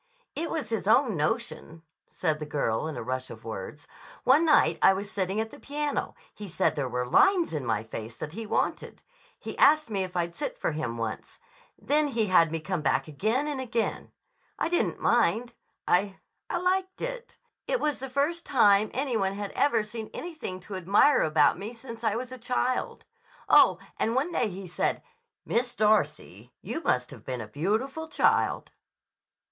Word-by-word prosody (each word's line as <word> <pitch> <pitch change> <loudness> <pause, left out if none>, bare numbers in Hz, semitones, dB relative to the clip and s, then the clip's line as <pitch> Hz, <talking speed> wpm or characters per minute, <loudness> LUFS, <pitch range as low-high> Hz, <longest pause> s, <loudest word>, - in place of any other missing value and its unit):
"It 330 +2 -2
was 315 -3 -3
his 220 -3 -2
own 225 -1 +4
notion," 160 +1 -3 0.2
said 155 -4 -1
the 150 - -4
girl 140 -2 -1
in 160 - -5
a - - -4
rush 130 0 -3
of 110 - -10
words. 110 +7 -7 0.4
"One 290 +6 +5
night 300 - +4
I - - +7
was 200 +2 -5
sitting 190 +1 -1
at 220 0 -2
the - - -12
piano. 295 0 -3 0.2
He 210 - -8
said 180 - 0
there 135 -3 -2
were 125 +1 -2
lines 355 - +4
in 150 -3 -2
my 110 -3 -1
face 110 0 -7
that 150 - -6
he 220 +5 -6
wanted. - - -2 0.3
He - - -7
asked 305 -4 +5
me 195 -2 0
if 185 -1 -5
I'd 170 0 -1
sit - - -4
for - - -1
him 150 -7 -3
once. 115 -1 -5 0.4
Then 300 +1 +1
he 230 -5 0
had 170 -5 +4
me 165 - -2
come 180 +1 -3
back 145 - +1
again 215 - 0
and 290 -3 -3
again. 235 -3 -2 0.5
I - - -1
didn't 345 - 0
mind. 235 +1 +2 0.3
I—I 190 +2 -1
liked 375 +1 -1
it. - - -6 0.3
It - - +1
was 300 -3 -1
the 265 +1 -6
first 290 +6 0
time 210 -5 +4
any 265 -1 -1
one 195 -3 +1
had 200 0 -5
ever 235 -7 +2
seen 215 +1 -7
anything 310 - -6
to 190 +1 -7
admire 200 - +4
about 155 0 +3
me 215 +4 -6
since 230 -1 -9
I 220 -2 +1
was 250 +2 -4
a 255 - -8
child. 250 +1 -1 0.4
Oh, - - +6 0.2
and 230 - 0
one 290 +7 +1
day 240 -9 0
he 190 0 -8
said: 180 - -1 0.4
'Miss 240 +1 -1
Darcy, 215 0 0
you 325 - -4
must 125 - 0
have - - -11
been 130 -2 -4
a 110 - -7
beautiful 220 - -2
child. - - +1
215 Hz, 185 wpm, -27 LUFS, 165-270 Hz, 0.5 s, I